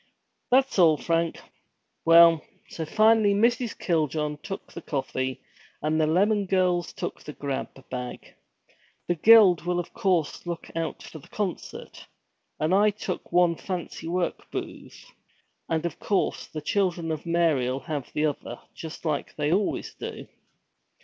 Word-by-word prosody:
'That's 260 -4 +3
all, 160 -4 +6
Frank. 165 +1 0 0.7
Well! 165 -1 +7 0.3
So 160 - -5
finally 215 +1 +4
Mrs. 235 +2 +1
Kiljohn 155 -3 -1
took 195 - -7
the 170 - -7
coffee, 130 -3 -3 0.4
and 155 +1 0
the 155 - +2
Lemmon 200 +5 +2
girls 180 -2 +1
took - - -5
the 150 - -8
grab 140 -2 -4 0.2
bag. 125 -1 -6 0.7
The 175 - +2
Guild 195 0 +7
will 180 +1 -1
look 175 -1 -2
out 165 -1 -3
for 160 - -10
the - - -17
concert, 200 -5 -5 0.5
and 155 +4 +1
I 205 +2 +5
took 205 -2 -5
one 175 -1 +4
fancy 175 -2 -5
work 175 +1 -2
booth, - - -7 0.6
and 165 0 0
of 170 -3 -4
course, 200 - -1
the 155 - -6
Children 175 -1 0
of 155 +2 -5
Mary'll 145 -7 +1
have 150 -5 -5
the 150 - 0
other, 135 -5 -3
just 160 +1 -9
like 150 -3 -2
they 150 +1 0
always 200 +2 -1
do.' - - -7
170 Hz, 140 wpm, -26 LUFS, 155-190 Hz, 0.7 s, Well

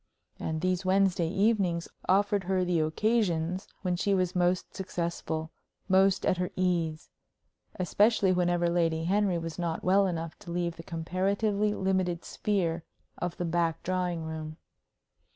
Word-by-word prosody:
And 160 0 -3
these 185 0 0
Wednesday 185 -3 +2
evenings 195 -3 +1 0.2
offered 200 0 +3
her 185 0 +1
the 175 -2 +1
occasions 180 0 0 0.2
when 180 -2 +1
she 195 +3 +1
was 185 -1 0
most 180 0 +1
successful, 170 -4 -3 0.4
most 190 0 +4
at 185 - +2
her 180 0 -1
ease 170 -4 -1 0.6
especially 200 +3 +3
whenever 175 -1 +2
Lady 165 -2 +1
Henry 195 +1 +2
was 165 0 -5
not 170 -2 -2
well 195 +2 +4
enough 165 -2 -4
to - - -12
leave 170 -1 -1
the - - -7
comparatively 200 +5 0
limited 185 -2 0
sphere 175 -5 -1 0.4
of 175 -1 -3
the 175 - -2
back 165 -1 0
drawing 180 -2 -1
room. 160 -1 -6
180 Hz, 140 wpm, -29 LUFS, 170-190 Hz, 0.6 s, most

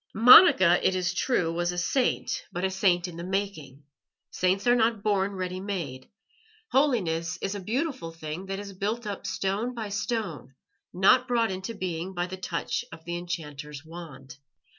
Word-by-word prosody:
Monica, 220 - +8
it 185 - +2
is 180 0 0
true, 180 -5 0
was 175 +1 0
a 175 - -6
Saint, 250 +8 0
but 175 - -4
a 190 - +1
Saint 185 -2 +2
in 170 -2 -9
the 170 - -6
making. 180 -8 -4 0.5
Saints 185 +2 0
are 240 - +5
not 225 -3 +1
born 200 -1 +1
ready 185 -1 -4
made; 170 -10 -5 0.6
holiness 175 - +1
is 195 - -3
a 205 - -4
beautiful 250 - -3
thing 165 +3 -7
that 195 0 -3
is 200 0 -7
built 215 +5 -3
up 205 -2 -5
stone 210 +6 -2
by 220 -3 -4
stone, 205 - -4 0.4
not 200 +8 +4
brought 235 -4 +1
into 190 +5 -5
being 185 -1 -4
by 175 0 -1
the 185 +1 -6
touch 185 -2 -3
of 160 0 -12
the 170 0 -3
enchanter's 150 -4 -6
wand. 150 -5 -10
185 Hz, 170 wpm, -27 LUFS, 170-205 Hz, 0.6 s, Monica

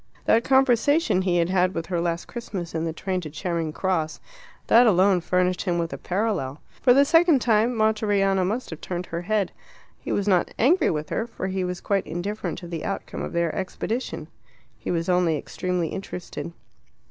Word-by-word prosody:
That 230 +1 +4
conversation 265 - +3
he 180 -2 +1
had 170 0 +2
had 185 0 +2
with 165 - -2
her 175 -1 -1
last 170 0 -2
Christmas 195 -8 -6
in 160 0 -1
the 165 - -1
train 185 +3 -3
to 155 - -7
Charing 165 +1 -2
Cross 160 -2 -1 0.5
that 240 +2 +6
alone 190 -2 +4
furnished 180 +1 +1
him 175 -2 0
with 170 -1 -2
a - - -4
parallel. 180 -9 -2 0.2
For 250 - +5
the 275 +3 +6
second 330 0 +5
time, 230 +1 +2
Monteriano 205 -3 +2
must 215 +6 -2
have 160 - -8
turned 180 0 -4
her 170 0 -4
head. 205 +1 0 0.5
He - - -6
was 200 0 0
not 185 -3 +2
angry 315 +7 +4
with 150 -1 -3
her, 225 - -2
for 230 - -6
he 190 0 -1
was 180 -1 -4
quite 200 -2 0
indifferent 200 +6 -4
to 175 - -8
the 170 -2 -5
outcome - - -4
of - - -4
their 170 -1 0
expedition. 195 -2 -3 0.5
He - - -6
was 165 -1 -1
only 180 -3 +2
extremely 180 +2 -2
interested. 180 -3 -6
185 Hz, 190 wpm, -24 LUFS, 170-215 Hz, 0.5 s, that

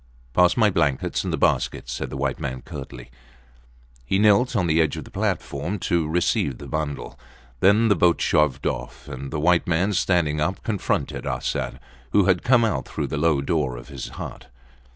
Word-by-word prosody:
Pass 90 - +4
my 110 -3 +4
blankets 70 -7 0
and - - -2
the - - -1
basket, - - 0
said 60 0 -4
the 65 - -6
white 70 -1 -1
man, 65 -1 -4
curtly. 60 -4 -9 0.9
He 80 +10 0
knelt 110 +5 +4
on 95 -5 +2
the 80 0 +3
edge 75 -3 0
of - - -5
the - - -14
platform 75 +9 -2
to 85 -3 +1
receive 80 -6 +1
the - - -10
bundle. 75 -2 -4 0.4
Then 105 - +5
the 105 - +4
boat 85 0 +3
shoved 75 -5 +1
off, 60 0 -4
and 70 +2 -6
the 75 - -3
white 85 +2 +3
man, 90 +4 +1
standing 85 -5 +1
up, 95 +5 -1
confronted 105 -4 -2
Arsat, - - -2 0.3
who 100 -2 +5
had 90 -1 +3
come 120 -2 +4
out 75 -12 -1
through - - -3
the 75 - -2
low 75 -2 +2
door 70 -4 -1
of - - -11
his - - -6
hut. - - -7
80 Hz, 190 wpm, -23 LUFS, 70-95 Hz, 0.9 s, Then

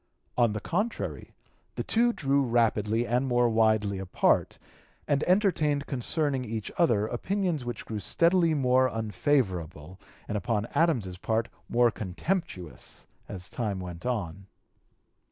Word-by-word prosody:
On 120 -3 +3
the 110 - -3
contrary 205 - -3 0.4
the - - -2
two 240 +1 +2
drew 140 -8 +1
rapidly 115 -2 +1
and 125 +3 0
more 120 -1 +3
widely 110 -3 +2
apart, 95 -1 +1 0.5
and 145 - +2
(p. - - -1
241) - - +4
entertained 160 -8 +2
concerning 135 +1 -1
each 110 -2 -5
other 115 -12 +3
opinions 175 - -1
which 120 -2 -5
grew 110 -2 -4
steadily 170 - +3
more 130 -2 +3
unfavorable, 95 - -1 0.3
and 105 - -1
upon 105 +2 -1
Adams's 115 - +1
part 110 +3 -1 0.2
more 120 0 +4
contemptuous, 95 - -4 0.2
as 90 -2 -6
time 105 -5 -3
went 90 -2 -7
on. 100 -6 -3
120 Hz, 135 wpm, -28 LUFS, 105-145 Hz, 0.5 s, 241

